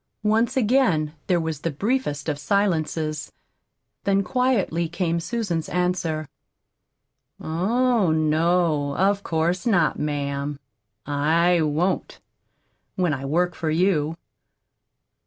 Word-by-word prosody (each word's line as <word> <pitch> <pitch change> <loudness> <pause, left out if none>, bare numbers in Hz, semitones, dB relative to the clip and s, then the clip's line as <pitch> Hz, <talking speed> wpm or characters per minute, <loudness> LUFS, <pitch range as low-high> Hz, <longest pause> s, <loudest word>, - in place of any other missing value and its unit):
Once 220 +4 +2
again 215 - +2
there 180 -2 +2
was 160 -3 -3
the 165 - -2
briefest 165 - -2
of 145 -2 -2
silences, 160 -5 -1 0.7
then 195 0 +2
quietly 200 -10 0
came 170 -1 -1
Susan's 180 -4 -2
answer: 175 -4 -1 1.1
"Oh, 220 +5 +1
no, 155 -1 +1
of 200 +1 +2
course 170 +3 -1
not, 175 -8 +2
ma'am. 145 -1 -2 0.5
I 160 +4 +2
won't 155 +5 -1 0.8
when 180 -4 +1
I 135 -1 -4
work 175 +5 +1
for 160 -1 -3
you. 160 -2 +1
170 Hz, 100 wpm, -24 LUFS, 155-195 Hz, 1.1 s, Once